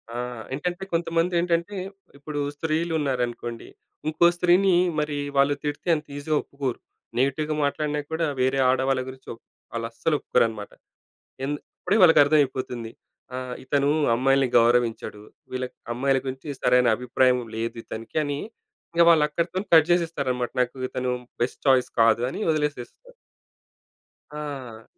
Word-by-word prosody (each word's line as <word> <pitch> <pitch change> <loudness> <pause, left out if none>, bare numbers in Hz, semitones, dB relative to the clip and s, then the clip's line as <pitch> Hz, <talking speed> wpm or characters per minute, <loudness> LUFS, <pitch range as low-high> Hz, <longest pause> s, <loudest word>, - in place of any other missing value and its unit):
ఆ! - - -3 0.4
ఏంటంటే 175 +6 -3
కొంతమంది 165 +1 +1
ఏంటంటే 170 +3 0 0.4
ఇప్పుడు 145 +1 -5 0.2
స్త్రీలు 160 +2 -1
ఉన్నారనుకోండి. 120 -4 -3 0.4
ఇంకో 160 +2 +3
స్త్రీని 180 +2 +4 0.2
మరి 150 -1 -1 0.2
వాళ్ళు 140 +1 +4
తిడితే 145 +4 -4
అంత 150 0 -6
ఈజీగా 150 +1 0
ఒప్పుకోరు. 140 -3 -4 0.4
నెగెటివ్‌గా 150 +4 0
మాట్లాడిన 150 +1 -1
కూడా 165 +1 0 0.2
వేరే 130 +1 +2
ఆడవాళ్ళ 130 0 +1
గురించి 130 0 -13
ఒప్ 115 - -17 0.3
వాళ్ళుస్సలు 115 +7 -1
ఒప్పుకోరు - - +2
అనమాట. 105 -2 -8 0.7
ఎందు 145 +1 -2 0.2
అప్పుడే 210 - +2
వాళ్ళకి 170 -3 +7
అర్థం 150 +1 +3
అయిపోతుంది. 125 -3 -5 0.4
ఆహ్, 125 -1 -5
"ఇతను 140 +1 +1 0.3
అమ్మాయిల్ని 135 +1 +2
గౌరవించడు. 115 -3 +2 0.3
వీళ్ళ 130 0 -2 0.3
అమ్మాయిల 135 +2 +1
గురించి 130 +3 -6
సరైన 125 0 +4
అభిప్రాయం 125 +1 +2 0.2
లేదు 115 +1 -3
ఇతనికి" 115 +5 -7
అని. 145 0 -3 0.5
ఇంకా 170 - +5
వాళ్ళు 160 -3 +6
అక్కడితోని 175 +6 -2
కట్ 160 0 +7
చేసేస్తారన్నమాట. 140 -8 0
"నాకు 125 +1 -1
ఇతను 125 0 -2 0.3
బెస్ట్ 125 - -4
ఛాయిస్ 130 -2 +4
కాదు" 115 +1 +5
అని 195 - -6
వదిలేసేస్తారు. 150 - -4 1.2
ఆ! 135 -7 -7
140 Hz, 130 wpm, -25 LUFS, 125-155 Hz, 1.2 s, వాళ్ళకి